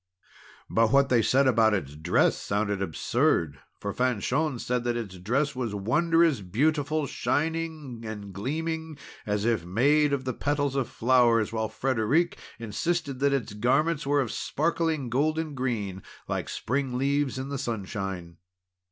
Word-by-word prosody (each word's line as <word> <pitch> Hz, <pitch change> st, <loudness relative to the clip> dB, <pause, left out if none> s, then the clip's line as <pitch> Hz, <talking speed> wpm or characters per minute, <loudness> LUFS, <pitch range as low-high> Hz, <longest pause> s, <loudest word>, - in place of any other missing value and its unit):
But 115 Hz, 0 st, +2 dB
what 140 Hz, 0 st, +4 dB
they 120 Hz, -2 st, +4 dB
said 135 Hz, +5 st, +3 dB
about 115 Hz, -4 st, +4 dB
its 75 Hz, -7 st, -4 dB
dress 80 Hz, +4 st, +2 dB
sounded 100 Hz, -1 st, -1 dB
absurd. 80 Hz, -4 st, 0 dB, 0.2 s
For 100 Hz, -1 st, -4 dB
Fanchon 130 Hz, +4 st, 0 dB
said 125 Hz, +1 st, -1 dB
that 120 Hz, -1 st, 0 dB
its 100 Hz, -6 st, -6 dB
dress 130 Hz, +9 st, 0 dB
was 120 Hz, -5 st, -3 dB
wondrous 155 Hz, -, +2 dB
beautiful, 145 Hz, -, 0 dB
shining 155 Hz, -4 st, -2 dB
and 105 Hz, -3 st, -7 dB
gleaming, 160 Hz, -, -3 dB, 0.3 s
as 105 Hz, 0 st, 0 dB
if 115 Hz, -7 st, +1 dB
made 140 Hz, -, +3 dB
of 135 Hz, -2 st, -1 dB
the 130 Hz, -, -1 dB
petals 145 Hz, 0 st, -1 dB
of 135 Hz, -4 st, 0 dB
flowers; 115 Hz, -3 st, +3 dB
while 110 Hz, -1 st, -1 dB
Frederic 135 Hz, +6 st, +1 dB, 0.2 s
insisted 140 Hz, +5 st, -2 dB
that 140 Hz, +1 st, +3 dB
its 135 Hz, -7 st, -1 dB
garments 135 Hz, +8 st, +1 dB
were 145 Hz, 0 st, +3 dB
of 120 Hz, -4 st, -3 dB
sparkling 160 Hz, -2 st, -1 dB
golden 155 Hz, +4 st, 0 dB
green, 110 Hz, -8 st, -3 dB, 0.3 s
like -, -, -3 dB
spring 130 Hz, 0 st, -2 dB
leaves 140 Hz, 0 st, 0 dB
in 130 Hz, +1 st, -4 dB
the 140 Hz, -1 st, -3 dB
sunshine. 95 Hz, -6 st, -4 dB
130 Hz, 145 wpm, -27 LUFS, 110-145 Hz, 0.3 s, what